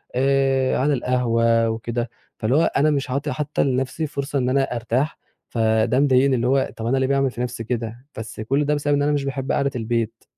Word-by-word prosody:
آآ، 135 0 +2
على 145 +3 +2
القهوة 115 -3 +2
وكده، 115 +1 -3 0.3
فاللي 130 +9 +2
أنا 155 -1 +2
مش 140 -2 -1
عاطي 135 +2 -2
حتى 145 +3 -1
لنفسي 135 +4 -1
فرصة 140 0 -3
إن 125 0 0
أنا 135 +1 +2
أرتاح 120 +6 -1 0.3
فده 110 +2 +2
مضايقني، 135 -1 +4
اللي 120 0 0
هو 135 +1 +2
طب 115 - -5
أنا 130 +3 +1
ليه 130 0 +1
باعمل 135 -1 +1
في 120 - -6
نفسي 120 -2 -3
كده! 115 +1 -4
بس 110 -1 -7
كل 135 +6 0
ده 150 +1 +1
بسبب 145 0 0
إن 145 - +2
أنا 145 +1 +2
مش 145 -1 0
باحب 135 -1 -3
قعدة 140 0 +1
البيت. 115 -1 -2
130 Hz, 200 wpm, -22 LUFS, 115-140 Hz, 0.3 s, مضايقني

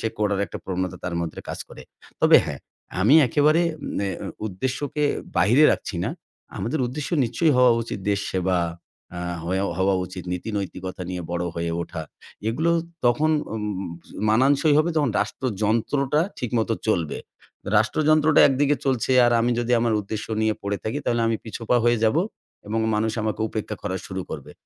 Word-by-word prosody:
সে 115 - 0
করার 100 -2 +1
একটা - - -7
প্রবণতা 95 -1 -3
তার 90 -1 -2
মধ্যে 85 -2 -4
কাজ - - -4
করে। - - -11 0.4
তবে - - +7
হ্যাঁ, - - -5 0.4
আমি 110 +10 +5
একেবারে 150 +6 +3 0.4
নে 100 - 0 0.2
এম - - -4 0.2
উদ্দেশ্যকে 130 +8 -2 0.3
বাহিরে 120 +11 +5
রাখছি 95 - -4
না। - - -1 0.5
আমাদের 145 +7 -2
উদ্দেশ্য 140 +4 -5
নিশ্চয়ই 125 +8 +2
হওয়া 125 -1 +6
উচিত 115 - -5
দেশ 100 0 +1
সেবা। 95 -1 +1 0.6
আ - - -4 0.2
হয়া 95 +3 0
হওয়া 95 +1 +3
উচিত 90 -1 -8
নীতিনৈতিকতা 95 -1 -4
নিয়ে 90 -1 -4
বড় 85 0 -1
হয়ে 85 0 -2
ওঠা। 85 -1 -6 0.5
এগুলো 160 +9 +1 0.3
তখন 125 +6 +3 0.2
উম 110 - -3 0.7
মানানসই 140 +6 +4
হবে 160 +3 +2
যখন 145 -5 +2
রাষ্ট্রযন্ত্রটা 115 +6 0 0.2
ঠিকমত 115 -2 -1 0.2
চলবে। 85 -8 0 0.6
রাষ্ট্রযন্ত্রটা 155 +7 +4
একদিকে 145 +2 +2
চলছে, 130 -1 +1
আর 120 - +3
আমি 120 - +2
যদি 120 +1 -1
আমার 115 -1 +1
উদ্দেশ্য 105 +1 -5 0.2
নিয়ে 110 0 +2
পড়ে 100 0 -1
থাকি 110 +6 -2
তাহলে 120 0 +1
আমি 115 0 +1
পিছপা 115 +2 -1
হয়ে 120 0 +3
যাবো 130 +10 +3 0.4
এবং 110 +2 -1
মানুষ 110 +1 0
আমাকে 110 0 -2
উপেক্ষা 110 -1 -4
করা 95 - -2
শুরু 95 0 -4
করবে। 75 -4 -7
110 Hz, 160 wpm, -24 LUFS, 95-135 Hz, 0.7 s, তবে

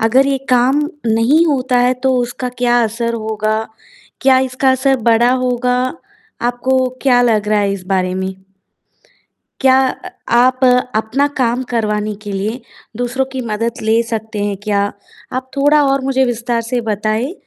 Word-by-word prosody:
अगर 250 +5 +3
ये 275 -1 0
काम 255 +3 +3 0.3
नहीं 230 +9 +3
होता 255 -4 +1
है 250 +1 +3
तो 265 -1 +2
उसका 245 +1 -3
क्या 245 -1 +3
असर 230 +1 -2
होगा? 215 -1 -2 0.6
क्या 265 -1 +4
इसका 260 +1 +1
असर 265 +1 +2
बड़ा 235 +2 +4
होगा? 250 0 0 0.7
आपको 255 +2 +1
क्या 250 -3 +4
लग 215 -3 +1
रहा 215 0 +2
है 200 -1 0
इस 190 -2 -6
बारे 185 -1 0
में? 190 0 -3 1.3
क्या 265 0 +5
अ, - - -7 0.2
आप 250 +2 +3 0.4
अपना 220 +6 +1
काम 245 0 +1
करवाने 215 -2 -1
के 205 - -5
लिए 210 +6 -3 0.4
दूसरों 245 +2 -1
की 260 - -3
मदद 230 +3 -3
ले 220 +1 +2
सकते 220 -2 -3
हैं 205 -1 -2
क्या? 205 -2 0 0.5
आप 260 +1 -4
थोड़ा 290 +2 +4
और 275 - +1
मुझे 265 0 +2
विस्तार 235 -1 -1
से 240 +2 -2
बताएँ 215 - -1
240 Hz, 160 wpm, -16 LUFS, 215-260 Hz, 1.3 s, क्या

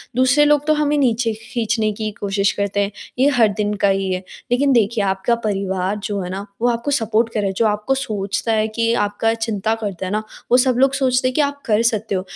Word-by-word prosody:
दूसरे 260 +4 +4
लोग 295 -1 +3
तो 310 - +5
हमें 300 0 +1
नीचे 235 -4 +1
खींचने 225 -1 -1
की 215 0 -4
कोशिश 200 -1 +1
करते 200 +1 -2
हैं 200 - -3 0.3
ये 265 - +5
हर 230 -3 +5
दिन 210 0 0
का 200 - +6
ही 195 -1 0
है। 185 +1 -4 0.3
लेकिन 275 +3 +3
देखिए 220 -1 +2
आपका 195 +4 +1
परिवार 195 -1 -1
जो 205 -1 -2
है 180 - -5
ना, 195 +2 -5 0.2
वो 245 - +3
आपको 235 +4 -2
सपोर्ट 225 -3 +1
कर 220 - -1
रहा 205 - 0
है 195 - -2
जो 230 - +2
आपको 210 +5 0
सोचता 215 -3 -2
है 215 0 +1
कि 230 +1 0
आपका 205 +2 0
चिंता 225 -1 -1
करता 195 -4 -4
है 185 - -4
ना, 215 +1 -1 0.3
वो 250 - +7
सब 255 -1 +3
लोग 270 +1 +4
सोचते 255 -2 +1
हैं 255 - -1
कि - - +3
आप 285 0 -2
कर 215 -2 +2
सकते 220 -3 0
हो 185 - 0
220 Hz, 240 wpm, -20 LUFS, 200-250 Hz, 0.3 s, वो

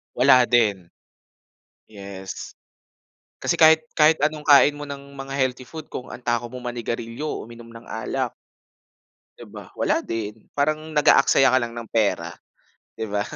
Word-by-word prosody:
Wala 125 0 +6
din. 105 -8 +1 1.0
Yes. 100 -2 -9 0.9
Kasi - - 0
kahit 160 0 +5
kahit 155 +1 +4
anong 150 +1 -1
kain 145 0 +6
mo 145 - -7
ng 140 -1 -9
mga 135 0 -7
healthy 130 -1 -1
food, 160 -2 -9
kung 125 - -8
ang - - -8
takaw 120 -1 -2
mong 125 -1 -5
manigarilyo 115 +3 -5
o - - -6
uminom 115 0 -13
ng 115 0 -13
alak 110 - -3 1.0
di - - -11
ba? - - -12
Wala - - +1
din. 110 -1 -5
Parang 155 +2 -1
nag-aaksaya 145 -3 +4
ka 130 - +5
lang 120 0 -4
ng 115 -1 -7
pera, 110 -3 0 0.7
di 110 - -3
ba? 100 -1 -1
125 Hz, 155 wpm, -23 LUFS, 115-145 Hz, 1.0 s, Wala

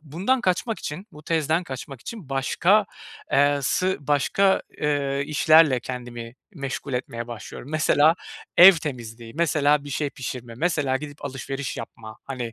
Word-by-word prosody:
bundan 185 - 0
kaçmak 200 +4 0
için 180 +8 -6
bu 150 - -13
tezden 160 +2 0
kaçmak 135 -2 -8
için 205 - -9
başka 170 +10 +2 0.5
eee, 145 +1 +4
sı 185 +8 +1
başka, 150 +7 +2 0.2
eee, 140 -2 0
işlerle 155 -3 +5
kendimi 120 -2 -7 0.2
meşgul 140 -1 -5
etmeye 120 -2 -4
başlıyorum. 120 +3 -9
Mesela 155 0 +4 0.4
ev 190 +3 +11
temizliği, 120 -8 -6
mesela 150 -3 +2
bir 145 - -8
şey 145 +1 -2
pişirme, 125 -3 -7
mesela 145 -4 0
gidip 145 0 -9
alışveriş 135 0 -5
yapma, 110 -1 -9
hani, 125 -4 -5
145 Hz, 140 wpm, -24 LUFS, 130-160 Hz, 0.5 s, ev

